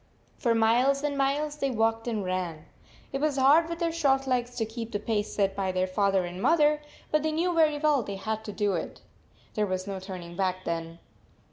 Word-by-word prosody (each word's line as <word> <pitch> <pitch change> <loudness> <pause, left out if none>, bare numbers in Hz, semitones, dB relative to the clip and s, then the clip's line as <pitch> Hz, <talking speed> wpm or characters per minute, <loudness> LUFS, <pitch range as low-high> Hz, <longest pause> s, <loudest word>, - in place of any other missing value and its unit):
For 235 -3 +2
miles 245 +5 +3
and 290 -1 -1
miles 290 +2 0
they 275 -2 0
walked 225 -1 0
and 215 -4 -2
ran. 180 -4 -3 0.5
It 270 - -2
was 300 -2 +1
hard 295 +5 +5
with 335 - -3
their 335 -1 0
short 275 -5 +2
legs 245 -1 -1
to 230 -2 -1
keep 225 +1 -6
the 205 - -2
pace 210 0 -1
set 195 -1 0
by 195 -1 -1
their 185 0 +1
father 195 0 +1
and 175 +2 -7
mother, 300 0 +3 0.3
but 305 - +3
they 315 +1 0
knew 345 +3 0
very 310 -3 +3
well 295 -2 +3
they 200 -3 -5
had 220 +2 -3
to 210 - -5
do 205 -1 0
it. 170 - -4 0.5
There 210 -1 0
was 185 0 -2
no 195 -1 -4
turning 180 -3 -8
back 185 0 -1
then. 165 0 -3
225 Hz, 215 wpm, -28 LUFS, 195-285 Hz, 0.5 s, hard